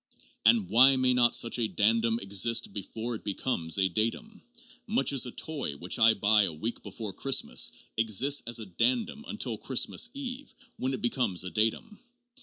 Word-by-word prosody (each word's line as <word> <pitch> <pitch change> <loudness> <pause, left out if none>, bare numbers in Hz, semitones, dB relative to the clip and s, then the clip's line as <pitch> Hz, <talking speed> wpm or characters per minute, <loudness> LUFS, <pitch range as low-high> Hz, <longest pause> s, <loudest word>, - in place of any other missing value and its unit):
And 225 -5 +4
why 130 +3 +6
may 130 -1 +2
not 120 -1 +3
such 115 +1 +1
a 115 - +1
dandum 115 +2 +1
exist 100 +2 +1
before 110 +4 -5
it 110 - -7
becomes 95 -5 -1
a 95 -1 +3
datum, 115 - -3 0.5
much 220 - +1
as 130 -2 +1
a - - -7
toy 140 - -4
which 90 +4 -3
I 110 0 +6
buy 105 +1 +4
a - - -2
week 110 +10 -5
before 110 -4 -7
Christmas 135 +6 0 0.3
exists 115 +6 +2
as 120 - 0
a 110 - -6
dandum 120 - -1
till 120 - -2
Christmas 135 - 0
Eve, 270 0 -7 0.2
when 130 +1 -2
it - - -9
becomes 120 -7 0
a 95 - -6
datum? 115 - -1
115 Hz, 175 wpm, -28 LUFS, 105-135 Hz, 0.5 s, why